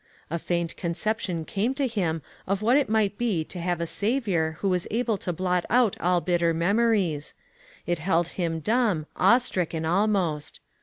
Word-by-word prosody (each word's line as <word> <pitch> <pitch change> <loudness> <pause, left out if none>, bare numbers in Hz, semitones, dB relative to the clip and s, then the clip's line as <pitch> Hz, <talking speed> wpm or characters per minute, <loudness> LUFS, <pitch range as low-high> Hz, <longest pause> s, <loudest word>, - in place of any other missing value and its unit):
A 170 - -1
faint 170 0 -2
conception 175 -1 -2
came 215 - -1
to 280 0 +1
him 175 - -1 0.2
of 195 +2 -1
what 240 +4 +4
it 285 -4 +2
might 215 -2 +1
be 215 -9 +1
to 175 - -7
have 175 0 -1
a 170 - -1
Saviour 200 -6 0
who 200 - -1
was 180 -2 0
able 230 0 0
to 180 - -3
blot 180 +1 0
out 240 -2 +3
all 180 0 +2
bitter 170 -2 +1
memories; 190 -4 +1 0.5
it 175 -2 -1
held 170 0 +1
him 165 -3 -2
dumb, 210 -5 +1
awe 240 - +5
stricken 175 -9 -2
almost. 175 -4 0
180 Hz, 170 wpm, -26 LUFS, 170-215 Hz, 0.5 s, awe